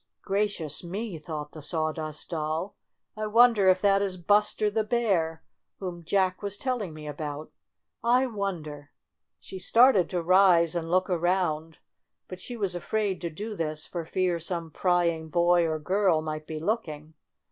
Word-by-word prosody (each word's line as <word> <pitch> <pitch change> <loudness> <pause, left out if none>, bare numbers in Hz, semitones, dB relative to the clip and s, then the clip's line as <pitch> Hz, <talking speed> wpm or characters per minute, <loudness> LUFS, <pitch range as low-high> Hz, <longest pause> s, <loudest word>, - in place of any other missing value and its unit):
"Gracious 195 -7 -1
me!" 190 0 -5
thought 150 -2 -6
the 155 - -10
Sawdust 155 0 -3
Doll, 160 +4 -2 0.4
"I 215 0 -3
wonder 225 -3 +5
if 185 0 +3
that 200 -1 +4
is 190 -2 -2
Buster 210 +3 +2
the 220 +1 +1
Bear 195 -9 0 0.3
whom 175 -3 -6
J 185 +5 0
ack 185 -1 +1
was 205 0 -4
telling 245 -9 -2
me 155 -1 -9
about. 150 0 -6 0.5
I 250 +3 +4
won 200 -8 -3
der 145 -1 -10 0.3
!" - - -57
She 190 - -8
started 230 -4 +5
to 175 -2 -2
rise 180 -2 +5
and 165 -2 -3
look 185 +2 +2
around, 170 -3 0 0.5
but 185 - -8
she 240 +6 -7
was 200 -4 -1
afraid 190 +1 -2
to 170 - -2
do 210 +7 -6
this 155 -3 -3
for 170 -2 -5
fear 180 +1 0
some 170 -1 -4
pry 175 +1 +2
ing 160 -1 -2
boy 175 0 +3
or 160 -1 -1
girl 180 0 +1
might 155 0 -5
be 155 - -5
looking. 155 -4 -3
175 Hz, 170 wpm, -27 LUFS, 160-200 Hz, 0.5 s, wonder